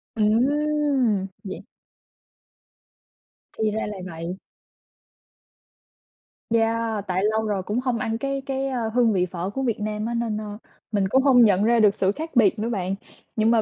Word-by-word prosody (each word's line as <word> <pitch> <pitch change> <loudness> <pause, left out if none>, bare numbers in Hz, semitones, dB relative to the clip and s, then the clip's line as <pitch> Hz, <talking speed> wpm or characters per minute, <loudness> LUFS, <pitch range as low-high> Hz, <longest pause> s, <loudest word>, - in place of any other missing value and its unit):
Ừm! 260 -1 +2 0.2
Vậy 190 - -6 2.0
Thì 215 -1 +1
ra 220 +1 -2
là 210 -1 -6
vậy. 170 +1 -6 2.1
Yeah, 225 -1 +1
tại 185 +1 0
lâu 220 0 0
rồi 205 -3 -1
cũng 210 +5 -1
hông 250 -2 -1
ăn 225 +1 -1
cái 275 +2 -2
cái, 270 0 -2
a, 245 -4 -2
hương 235 -3 +4
vị 180 -2 +2
phở 180 +1 -3
của 270 +6 -3
Việt 235 -5 -1
Nam 210 0 -3
á 235 - -2
nên, 230 -2 -1
a, 210 -1 -7 0.3
mình 200 -3 +1
cũng 260 +7 +3
hông 250 -4 +6
nhận 200 -2 +3
ra 235 +1 +4
được 210 -2 +5
sự 190 0 +2
khác 315 +6 -7
biệt 215 -3 +4
nữa 225 +2 -1
bạn, 190 -4 -1 0.4
nhưng 220 0 +3
mà 230 -1 +4
220 Hz, 170 wpm, -24 LUFS, 205-245 Hz, 2.1 s, hông